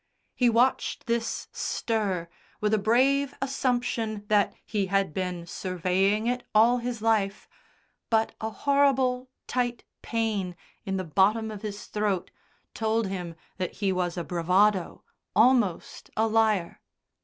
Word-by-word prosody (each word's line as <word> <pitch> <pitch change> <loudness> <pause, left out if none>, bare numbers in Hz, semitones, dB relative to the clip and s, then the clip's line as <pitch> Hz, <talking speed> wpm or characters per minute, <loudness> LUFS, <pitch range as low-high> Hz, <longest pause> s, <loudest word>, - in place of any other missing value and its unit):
He 245 -2 +3
watched 240 +3 +1
this 235 -1 -2
stir 200 -7 -1 0.3
with 210 0 +1
a 215 - +4
brave 265 +6 +2
assumption 245 -5 -1
that 210 -1 +3
he 205 -3 -1
had 195 -3 +1
been 180 -2 -3
surveying 185 +4 0
it 245 +1 -1
all 235 +3 +5
his 240 -2 -4
life, 215 -3 +1 0.6
but 225 -1 +2
a 220 - -1
horrible 260 -1 +2 0.2
tight 245 -2 -1 0.2
pain 215 -6 -1 0.3
in 195 0 -1
the 185 - -2
bottom 205 +6 +2
of 210 -2 -8
his 205 -1 -6
throat 205 -4 -1 0.4
told 220 0 0
him 180 -3 -5 0.2
that 185 -2 -3
he 200 -2 0
was 180 -1 -1
a 175 - -2
bravado, 185 +3 +1 0.3
almost 225 -6 +2
a 220 - +3
liar. 220 -5 +1
215 Hz, 130 wpm, -27 LUFS, 190-235 Hz, 0.6 s, all